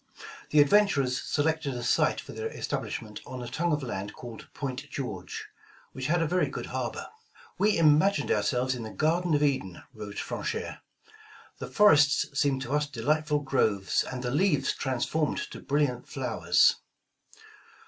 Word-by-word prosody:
The 150 Hz, -, +4 dB
adventurers 145 Hz, -7 st, +3 dB
selected 150 Hz, -2 st, 0 dB
a 120 Hz, -, -4 dB
site -, -, +2 dB
for -, -, -9 dB
their -, -, -4 dB
establishment, 105 Hz, -2 st, -5 dB
on 130 Hz, -1 st, -7 dB
a -, -, -6 dB
tongue 170 Hz, +8 st, -1 dB
of 150 Hz, -2 st, 0 dB
land 105 Hz, -4 st, -5 dB
called 120 Hz, -3 st, -10 dB
Point 140 Hz, +1 st, -5 dB
George," 105 Hz, -, -5 dB, 0.4 s
which 130 Hz, -1 st, -4 dB
had 170 Hz, +2 st, +2 dB
a -, -, +1 dB
very 180 Hz, +3 st, +1 dB
good -, -, -5 dB
harbor. -, -, -3 dB, 0.5 s
"We 210 Hz, -1 st, +3 dB
imagained 165 Hz, +5 st, +4 dB
ourselves 130 Hz, -1 st, +1 dB
in 125 Hz, -, -5 dB
the 110 Hz, -, -6 dB
garden 165 Hz, +5 st, +1 dB
of 145 Hz, -, +2 dB
Eden," 130 Hz, -11 st, -1 dB
wrote 105 Hz, -3 st, -8 dB
Franchere. -, -, -4 dB, 0.8 s
The -, -, -5 dB
forests 145 Hz, -10 st, +5 dB
seemed 135 Hz, -1 st, +1 dB
to 130 Hz, +2 st, -4 dB
us 150 Hz, 0 st, +1 dB
delightful 150 Hz, +3 st, 0 dB
groves, 110 Hz, -8 st, +1 dB
and 130 Hz, 0 st, -5 dB
the 120 Hz, -, -1 dB
leaves 145 Hz, -2 st, +2 dB
transformed 135 Hz, +4 st, -1 dB
to -, -, -8 dB
brilliant 140 Hz, -4 st, 0 dB
flowers." -, -, +2 dB
140 Hz, 155 wpm, -28 LUFS, 125-155 Hz, 0.8 s, forests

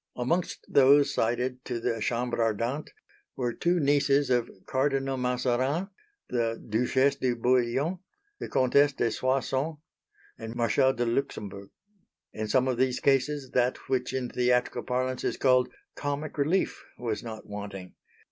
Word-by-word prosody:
Amongst 165 Hz, +9 st, -1 dB
those 140 Hz, +1 st, +5 dB
cited 125 Hz, +2 st, -1 dB
to 120 Hz, -2 st, -3 dB
the 115 Hz, -1 st, -2 dB
Chambre 120 Hz, +2 st, -1 dB
Ardente 115 Hz, +6 st, -1 dB, 0.5 s
were 120 Hz, -2 st, -1 dB
two 175 Hz, +6 st, +1 dB
nieces 140 Hz, -1 st, +3 dB
of 120 Hz, -2 st, +2 dB, 0.2 s
Cardinal 135 Hz, 0 st, 0 dB
Mazarin, 130 Hz, +7 st, 0 dB, 0.4 s
the 115 Hz, -2 st, -1 dB
Duchesse 130 Hz, +5 st, +2 dB
de 125 Hz, -2 st, 0 dB
Bouillon, 130 Hz, +8 st, +1 dB, 0.4 s
the -, -, -5 dB
Comtesse 140 Hz, +3 st, +3 dB
de 120 Hz, -3 st, 0 dB
Soissons, 135 Hz, +5 st, -1 dB, 0.6 s
and 115 Hz, +1 st, -7 dB
Marshal 125 Hz, +3 st, +3 dB
de 120 Hz, -, -1 dB
Luxembourg. 105 Hz, -6 st, -3 dB, 0.6 s
In 110 Hz, 0 st, -3 dB
some 130 Hz, +4 st, +2 dB
of 130 Hz, -2 st, 0 dB
these 130 Hz, -1 st, +1 dB
cases 135 Hz, 0 st, +1 dB
that 125 Hz, 0 st, +2 dB
which 130 Hz, -2 st, 0 dB
in 130 Hz, -2 st, -2 dB
theatrical 125 Hz, 0 st, +1 dB
parlance 130 Hz, +1 st, -2 dB
is -, -, -1 dB
called 130 Hz, -1 st, +3 dB, 0.2 s
"comic 145 Hz, +1 st, -3 dB
relief" 155 Hz, +7 st, 0 dB
was 110 Hz, -4 st, -3 dB
not 110 Hz, -2 st, -8 dB
wanting. 100 Hz, -3 st, -7 dB
125 Hz, 140 wpm, -28 LUFS, 120-135 Hz, 0.6 s, those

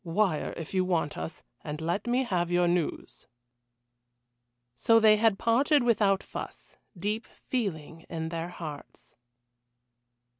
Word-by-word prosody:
Wire 175 Hz, -1 st, 0 dB
if 165 Hz, +1 st, -7 dB
you 185 Hz, -1 st, +2 dB
want 170 Hz, -5 st, 0 dB
us 80 Hz, 0 st, -6 dB, 0.2 s
and 150 Hz, 0 st, -5 dB
let 175 Hz, +7 st, -2 dB
me 250 Hz, +2 st, +2 dB
have 180 Hz, -7 st, 0 dB
your 175 Hz, 0 st, +3 dB
news." 175 Hz, -2 st, -2 dB, 1.5 s
So 225 Hz, -, +4 dB
they 215 Hz, -1 st, +6 dB
had 220 Hz, -2 st, +3 dB
parted 265 Hz, +6 st, +3 dB
without 205 Hz, -5 st, +3 dB
fuss, -, -, -8 dB, 0.2 s
deep 210 Hz, +5 st, -2 dB
feeling 165 Hz, -, -4 dB
in 160 Hz, -1 st, -3 dB
their 165 Hz, +1 st, -4 dB
hearts. 155 Hz, -4 st, -9 dB
180 Hz, 125 wpm, -28 LUFS, 165-220 Hz, 1.5 s, they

